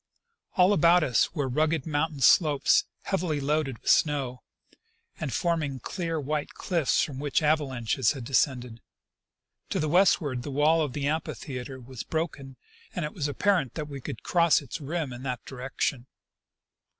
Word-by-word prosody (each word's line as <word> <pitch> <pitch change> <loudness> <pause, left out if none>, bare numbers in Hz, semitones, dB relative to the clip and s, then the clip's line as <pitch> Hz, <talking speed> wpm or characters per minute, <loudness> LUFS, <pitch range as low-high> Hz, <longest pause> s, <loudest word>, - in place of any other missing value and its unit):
All 185 +2 +5
about 170 -1 +5
us 130 -6 +2
were 145 -4 -1
rugged 155 +2 0
mountain 150 -1 -1
slopes, 145 0 +4 0.2
heavily 175 -6 -1
loaded 140 -2 -1
with - - +1
snow, 135 -5 +1 0.8
and 150 -4 -3
forming 155 -6 -1
clear 165 +5 -3
white 150 +1 -3
cliffs 170 - +1
from 135 -3 -5
which 145 +2 0
avalanches 135 -5 +1
had 135 -4 -7
de 130 +4 -9
scended. 125 -4 +1 0.9
To - - -1
the 155 - 0
westward 155 -6 +3
the 135 - -6
wall 150 +4 +3
of 145 -5 -2
the 140 0 -3
amphitheatre 135 -4 -4
was 125 -1 -8
broken, 150 -5 -4 0.4
and 175 -5 -1
it 150 - -6
was 150 -6 -2
apparent 150 - +1
that 150 -2 -4
we 140 -2 -7
could 115 - -7
cross 170 -2 +4
its 150 +3 -7
rim 150 -2 -3
in 120 - -8
that 125 -2 -4
di - - -10
rection. 130 0 -3
145 Hz, 160 wpm, -27 LUFS, 130-160 Hz, 0.9 s, All